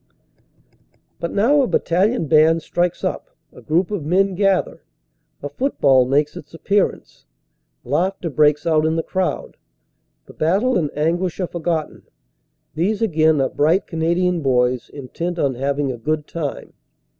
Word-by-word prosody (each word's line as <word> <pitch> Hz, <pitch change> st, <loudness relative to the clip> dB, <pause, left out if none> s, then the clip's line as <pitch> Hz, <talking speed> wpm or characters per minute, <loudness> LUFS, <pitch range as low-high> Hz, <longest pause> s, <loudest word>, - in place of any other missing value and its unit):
But 170 Hz, -, -3 dB
now 260 Hz, +9 st, +3 dB
a 260 Hz, -, +1 dB
battalion 190 Hz, +3 st, +1 dB
band 155 Hz, +2 st, +4 dB
strikes 175 Hz, 0 st, -1 dB
up, -, -, -4 dB, 0.2 s
a -, -, -14 dB
group 170 Hz, +5 st, 0 dB
of 200 Hz, -7 st, -3 dB
men 190 Hz, +5 st, +1 dB
gather, 195 Hz, 0 st, 0 dB, 0.6 s
a 145 Hz, -, -4 dB
football 140 Hz, -, +2 dB
makes 145 Hz, +3 st, +1 dB
its 150 Hz, -, -11 dB
appearance. 200 Hz, +4 st, -2 dB, 0.6 s
Laughter 175 Hz, +5 st, -1 dB
breaks 150 Hz, +1 st, +2 dB
out 155 Hz, -2 st, +2 dB
in 160 Hz, -, 0 dB
the 165 Hz, -, -1 dB
crowd; 185 Hz, -1 st, -3 dB, 0.7 s
the -, -, -15 dB
battle 200 Hz, +11 st, +1 dB
and 160 Hz, -6 st, 0 dB
anguish 170 Hz, +4 st, -1 dB
are 185 Hz, -, 0 dB
forgotten; 170 Hz, -2 st, -3 dB, 0.7 s
these 200 Hz, +8 st, -1 dB
again 160 Hz, -6 st, +2 dB
are 135 Hz, -, +1 dB
bright 160 Hz, +7 st, +1 dB
Canadian 170 Hz, +1 st, 0 dB
boys 125 Hz, -2 st, +1 dB
intent 165 Hz, +6 st, -5 dB
on 140 Hz, -5 st, 0 dB
having 140 Hz, +2 st, -1 dB
a 125 Hz, -, -6 dB
good 150 Hz, +4 st, -2 dB
time. 155 Hz, -4 st, -6 dB
165 Hz, 145 wpm, -20 LUFS, 150-185 Hz, 0.7 s, band